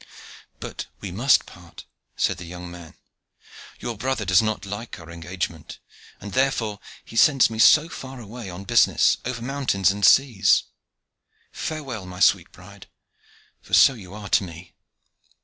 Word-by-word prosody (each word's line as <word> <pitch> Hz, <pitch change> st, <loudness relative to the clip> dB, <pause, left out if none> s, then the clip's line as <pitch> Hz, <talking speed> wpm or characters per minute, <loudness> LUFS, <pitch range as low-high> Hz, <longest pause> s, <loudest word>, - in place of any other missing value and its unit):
"But -, -, -7 dB
we 100 Hz, -, -7 dB
must 120 Hz, +9 st, +3 dB
part," 85 Hz, -2 st, -14 dB, 0.3 s
said -, -, 0 dB
the 90 Hz, -, -9 dB
young 90 Hz, +1 st, -9 dB
man; 85 Hz, -2 st, -12 dB, 0.8 s
"your 120 Hz, -1 st, -5 dB
brother 120 Hz, 0 st, -2 dB
does 95 Hz, +2 st, +4 dB
not 110 Hz, -1 st, -2 dB
like 105 Hz, +1 st, -7 dB
our 80 Hz, 0 st, -12 dB
engagement, 85 Hz, -1 st, -6 dB, 0.4 s
and 105 Hz, 0 st, -9 dB
therefore 125 Hz, -6 st, 0 dB, 0.3 s
he -, -, -13 dB
sends 135 Hz, -1 st, +5 dB
me 110 Hz, -, -6 dB
so 155 Hz, +7 st, +6 dB
far 135 Hz, -5 st, -9 dB
away 115 Hz, -1 st, -9 dB
on 90 Hz, +2 st, -8 dB
business, 115 Hz, 0 st, +3 dB
over 120 Hz, -2 st, -4 dB
mountains 125 Hz, -, +1 dB
and 100 Hz, +1 st, -6 dB
seas. 115 Hz, -5 st, +4 dB, 0.9 s
Farewell, 135 Hz, -11 st, -5 dB
my 90 Hz, 0 st, -9 dB
sweet 95 Hz, -2 st, +3 dB
bride; 100 Hz, +2 st, -15 dB, 0.7 s
for -, -, 0 dB
so 135 Hz, -, +7 dB
you 100 Hz, -7 st, -12 dB
are 105 Hz, -1 st, -8 dB
to -, -, +3 dB
me." 85 Hz, 0 st, -11 dB
105 Hz, 150 wpm, -23 LUFS, 90-120 Hz, 0.9 s, so